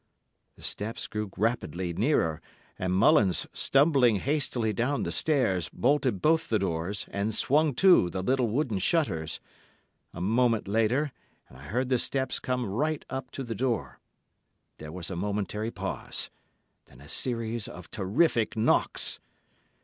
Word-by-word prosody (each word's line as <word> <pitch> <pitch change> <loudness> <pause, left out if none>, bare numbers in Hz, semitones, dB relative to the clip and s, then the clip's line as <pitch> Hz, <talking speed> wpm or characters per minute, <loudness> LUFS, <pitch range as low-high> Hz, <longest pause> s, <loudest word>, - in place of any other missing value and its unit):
The - - -15
steps 110 +3 -3
grew 105 -1 -4
rapidly 95 -5 -1
nearer, 85 - +1 0.4
and 90 0 -1
Mullins, 100 - +4
stumbling 135 -5 +4
hastily 125 -2 0
down 125 +7 0
the - - -2
stairs, 125 - +1
bolted 130 -7 +1
both 160 +1 +3
the 110 - +3
doors 95 +1 -2
and 100 +2 -1
swung 150 0 +2
to 180 - +6
the 95 +1 -4
little 130 +2 +2
wooden 115 -3 0
shutters. 95 - 0 0.7
A - - -9
moment 115 +3 +2
later, 115 +8 +1 0.4
and 65 - -15
I 70 - -12
heard 125 - -1
the 125 -2 +3
steps 130 +2 -1
come 125 -1 -1
right 145 +10 -1
up 130 -1 -4
to 135 - -4
the 115 -2 -4
door. 120 0 -2 0.8
There 75 0 -8
was 90 +1 -6
a - - -3
momentary 105 +3 -2
pause, - - -4 0.5
then 60 - -18
a 70 - -14
series 115 - -2
of 90 -2 -11
terrific 110 - +1
knocks. 110 - +2
115 Hz, 145 wpm, -28 LUFS, 95-130 Hz, 0.8 s, to